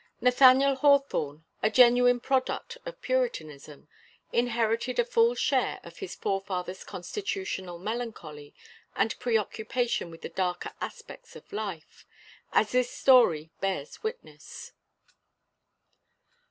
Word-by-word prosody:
Nathaniel 260 +2 +6
Hawthorne, 265 - +2 0.2
a 215 - +3
genuine 245 +1 +5
product 265 - -1
of - - -8
Puritanism, 155 - -3 0.5
inherited 235 0 0
a 485 - +3
full 475 0 +3
share - - 0
of - - -13
his 390 - -6
forefathers' 190 -1 -3
constitutional 190 - -5
melancholy 180 -8 -6 0.4
and 205 +3 +1
preoccupation 230 -2 -1
with 165 0 -13
the - - -5
darker 180 -2 -3
aspects - - -9
of - - -14
life 200 -7 -6 0.4
as 215 - +2
this 250 -1 +2
story 170 - +4
bears 190 -7 -3
witness. 450 +3 -8
230 Hz, 105 wpm, -28 LUFS, 180-260 Hz, 0.5 s, Nathaniel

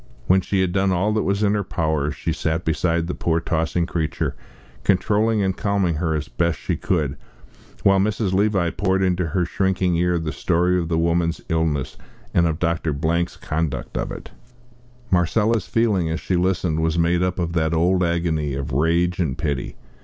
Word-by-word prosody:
When 95 +1 +4
she 95 +1 0
had 95 -2 +1
done 95 +1 +1
all 95 +4 +1
that 110 - +1
was 100 +2 0
in 100 0 +3
her 105 -1 0
power, 80 -5 -1
she 75 +3 -3
sat 80 +2 -2
beside 85 +1 +1
the 90 - -3
poor 80 -1 0
tossing 85 +1 0
creature, 80 -3 -2 0.5
controlling 105 +2 +2
and 95 -1 0
calming 100 -6 0
her 80 -1 0
as 75 -1 -3
best 85 -2 0
she - - -2
could, 75 -6 -1 0.7
while 100 0 +5
Mrs. 100 -1 0
Levi 95 -3 +2
poured 95 -1 0
into 90 -2 +1
her 90 +2 0
shrinking 95 0 0
ear 90 0 +2
the 80 -2 -3
story 90 +2 +1
of 85 - -2
the 80 0 0
woman's 85 0 +1
illness 80 -5 -1 0.4
and 85 0 +4
of 80 -2 -1
Dr. 85 -2 0
Blank's 85 +4 -1
conduct 80 -1 -3
of - - -2
it. - - -8 0.8
Marcella's 105 +4 +2
feeling, 105 -8 +1
as 80 +2 -2
she 95 - -1
listened, 90 -2 +1
was 80 +1 0
made 85 +1 +2
up 90 0 0
of 85 -2 -2
that 80 -2 +1
old 90 +3 +2
agony 85 -4 0
of 70 -1 -4
rage 85 +6 +1
and 75 -8 -1
pity! 70 -4 -3
85 Hz, 185 wpm, -22 LUFS, 80-95 Hz, 0.8 s, while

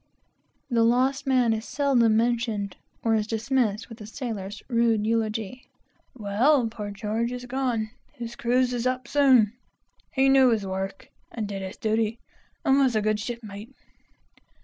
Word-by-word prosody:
The 235 -1 +3
lost 260 +4 +2
man 250 -4 +3
is 220 0 -3
seldom 240 -6 +2
mentioned, 225 -4 0 0.3
or 225 - +2
is 215 -1 +1
dismissed 225 -1 0
with 225 -1 -11
a 210 - -8
sailor's 215 -5 -6
rude 230 -3 +2
eulogy 225 +1 -2 0.5
"Well, 235 +6 +3
poor 210 -2 -6
George 215 +4 -2
is 250 0 -6
gone! 245 -4 -1 0.2
His 235 -4 -7
cruise 250 +1 +1
is 245 0 -1
up 255 0 -2
soon! 260 -7 +4 0.6
He 270 0 +3
knew 270 -1 +6
his 220 -4 +1
work, 190 0 -5 0.2
and 220 -3 -4
did 200 -1 -5
his 190 0 -7
duty, 220 +1 0 0.5
and 270 -1 +4
was 260 -4 +3
a 215 - +2
good 215 0 +1
shipmate." 215 -2 -7
230 Hz, 150 wpm, -26 LUFS, 215-250 Hz, 0.6 s, knew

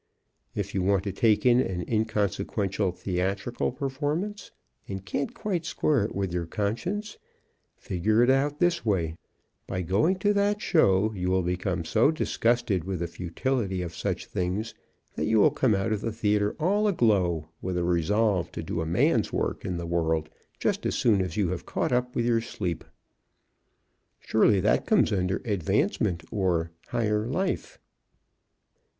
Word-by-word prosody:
If 100 -1 -3
you 95 - 0
want 95 0 +2
to 100 - -2
take 110 +4 +2
in 125 0 +6
an 90 -8 -1
inconsequential 105 -2 0
theatrical 95 +6 -2
performance 145 +10 -3 0.4
and 95 -1 -6
can't 135 +10 -2
quite 185 -6 -2
square 150 -6 +1
it - - -6
with 95 -2 -2
your 85 -2 -2
conscience, 175 - -3 0.6
figure 105 +6 +1
it 120 - +3
out 140 +2 +1
this 175 -1 +2
way: 85 -7 0 0.5
By 95 0 -2
going 105 - +2
to 205 +2 +2
that 205 +1 +1
show 110 - +3
you 90 -2 -2
will 95 0 +2
become 90 -1 -2
so 110 - +3
disgusted 120 - +1
with 95 +1 -3
the 85 0 -2
futility 95 +3 -2
of 85 -1 -6
such - - -3
things 95 +5 -2 0.4
that 75 - -2
you 110 0 +3
will - - +6
come 120 -6 +2
out 95 +3 -1
of 105 - -2
the 115 - -2
theater 105 -1 +1
all 205 +6 +2
aglow 95 - +2
with 90 -1 -2
a 90 - 0
resolve 90 +2 +1
to - - -5
do 80 - -3
a 80 - -3
man's 85 - +2
work - - -2
in 90 -2 -3
the 85 - -4
world 80 -2 0 0.3
just - - -1
as - - -1
soon 105 -5 +3
as 90 -1 -3
you 100 -5 +2
have 90 -1 -4
caught - - -1
up 125 0 0
with 115 - +1
your 115 -1 +2
sleep. 90 -7 -4 1.4
Surely 110 -2 +3
that 105 +3 +2
comes 210 - +3
under 95 0 0
"Advancement" 90 -3 0
or 85 -5 0 0.2
"Higher 105 -1 0
Life." 190 - -2
105 Hz, 165 wpm, -27 LUFS, 90-120 Hz, 1.4 s, in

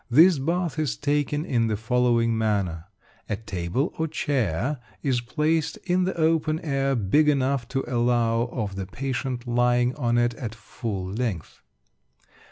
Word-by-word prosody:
This 160 +5 +6
bath 170 +2 -1
is 140 -9 -1
taken 145 +1 0
in 115 -3 +1
the 110 -2 -1
following 115 0 +2
manner. 100 -7 0 0.4
A 105 - 0
table 100 - -2
or 160 - +1
chair 135 - -1 0.2
is 130 -4 +1
placed 155 +5 0
in 180 0 +2
the 190 - -2
open 160 -1 +2
air, 135 -3 0
big 125 +8 +3
enough 135 -3 +1
to 135 +1 -2
allow 120 -1 +1
of 105 -6 -3
the 95 -1 -4
patient 125 +1 -3
lying 120 +1 +2
on 120 -4 +1
it 120 0 +2
at 115 -1 -6
full 105 -3 -5
length. 100 -3 -4
125 Hz, 150 wpm, -25 LUFS, 115-145 Hz, 0.4 s, This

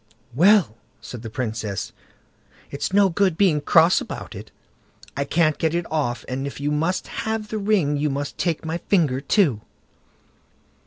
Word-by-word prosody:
"Well", 175 - +4 0.2
said 110 +1 -9
the 115 - -7
Princess, 110 -4 -4 0.8
"it's 140 - -3
no 200 0 +5
good 185 -1 +1
being 170 -7 +3
cross 165 +4 +4
about - - -7
it. - - -9 0.7
I 140 - -1
can't 155 0 +1
get 160 0 0
it 175 0 -1
off, 140 -6 -1
and 135 +2 -3
if 140 - -8
you 145 +1 -1
must 165 +5 0 0.2
have 220 -1 -3
the 215 - -3
ring, 195 -8 +1
you 150 +1 0
must 140 0 -4
take 165 -2 -1
my 160 +2 -3
finger 155 -9 +1
too." 140 - +2
155 Hz, 160 wpm, -22 LUFS, 135-185 Hz, 0.8 s, no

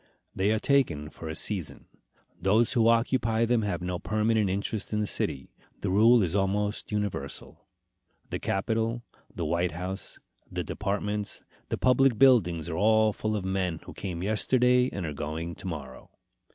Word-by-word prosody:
They 95 +2 +1
are 110 - +2
taken 95 - +1
for 80 - -8
a 80 - -4
season. 95 -4 -3 0.6
Those 110 +7 +3
who 115 -3 +3
occupy 115 -1 +2
them 120 0 +2
have 100 -4 -2
no 90 0 -2
permanent 110 -1 +1
interest 100 +2 -2
in 105 - +1
the 105 - +1
city. 65 -8 -2 0.3
The 95 - -1
rule 115 +3 +6
is 85 -2 -1
almost 100 +2 0
universal. 105 -9 -4 0.6
The - - -2
Capitol, 115 +4 -1 0.3
the 85 -4 -3
White 85 +3 0
House, 95 +2 -5 0.3
the - - -2
departments, 105 +1 -3 0.3
the - - -1
public 130 -1 +3
buildings 95 - +4
are 80 -2 -3
all 110 +1 +4
full 110 +1 -2
of 100 -3 -3
men 95 -3 -1
who - - -10
came 90 -3 -5
yesterday 125 +4 +3
and 100 -3 -4
are 75 - -4
going 80 +4 -4
to 95 - -8
morrow. 70 -7 -7
105 Hz, 165 wpm, -28 LUFS, 90-110 Hz, 0.6 s, rule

